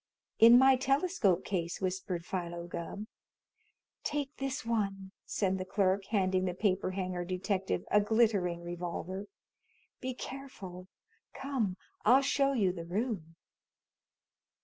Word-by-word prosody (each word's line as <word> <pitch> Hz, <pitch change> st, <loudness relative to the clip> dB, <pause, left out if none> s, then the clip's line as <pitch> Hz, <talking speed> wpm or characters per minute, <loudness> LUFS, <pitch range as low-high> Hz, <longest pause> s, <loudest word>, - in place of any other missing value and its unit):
"In 230 Hz, +2 st, +9 dB
my 265 Hz, 0 st, +6 dB
telescope 270 Hz, -, +2 dB
case," 175 Hz, -3 st, -2 dB
whispered 185 Hz, -2 st, -2 dB
Philo 175 Hz, -2 st, -4 dB
Gubb. 175 Hz, +4 st, -5 dB, 1.0 s
"Take 290 Hz, -1 st, -2 dB
this 270 Hz, +1 st, -3 dB
one," 195 Hz, -4 st, -1 dB, 0.2 s
said 190 Hz, -2 st, 0 dB
the -, -, -2 dB
clerk, 195 Hz, 0 st, +1 dB
handing 190 Hz, -3 st, +1 dB
the 180 Hz, -1 st, -2 dB
paper 190 Hz, -1 st, +1 dB
hanger 185 Hz, -1 st, -3 dB
detective 190 Hz, +2 st, -1 dB
a 210 Hz, -, +6 dB
glittering 205 Hz, -6 st, +2 dB
revolver. 175 Hz, +3 st, -5 dB, 0.7 s
"Be 255 Hz, -1 st, -4 dB
careful. 200 Hz, -10 st, -8 dB, 0.5 s
Come 240 Hz, -9 st, -1 dB, 0.3 s
I'll 255 Hz, +5 st, +6 dB
show 275 Hz, 0 st, +2 dB
you 200 Hz, -8 st, +2 dB
the 170 Hz, -2 st, -6 dB
room." 190 Hz, -4 st, -3 dB
195 Hz, 120 wpm, -32 LUFS, 180-240 Hz, 1.0 s, In